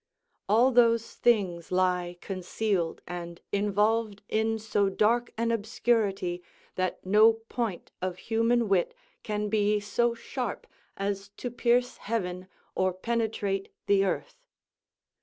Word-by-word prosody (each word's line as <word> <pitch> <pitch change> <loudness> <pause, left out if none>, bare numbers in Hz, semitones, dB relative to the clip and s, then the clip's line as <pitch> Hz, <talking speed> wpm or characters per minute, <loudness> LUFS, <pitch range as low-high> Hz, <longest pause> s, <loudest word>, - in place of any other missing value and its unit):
_ - - -58 0.5
"All 235 +5 +5
those 230 -2 +3
things 190 -8 +1
lie 180 -1 +1
concealed 185 -2 -2
and 170 -1 -6
involved 210 +1 +1
in 220 +1 +1
so 210 -2 +1
dark 230 +5 +2
an 230 +1 +1
obscurity 205 -5 0 0.3
that 185 0 -2
no 215 +4 +6
point 225 -3 -4
of 185 -1 -2
human 230 +2 +1
wit 190 -3 +1 0.3
can 210 -1 -2
be 210 0 +2
so 235 +3 0
sharp 245 -1 -4 0.3
as 195 0 -3
to 245 - -4
pierce 245 +1 +1
heaven 185 -4 -3 0.3
or 185 -1 +1
penetrate 205 -1 -1 0.2
the 200 -1 +4
earth." 195 - -3
210 Hz, 120 wpm, -28 LUFS, 185-230 Hz, 0.5 s, no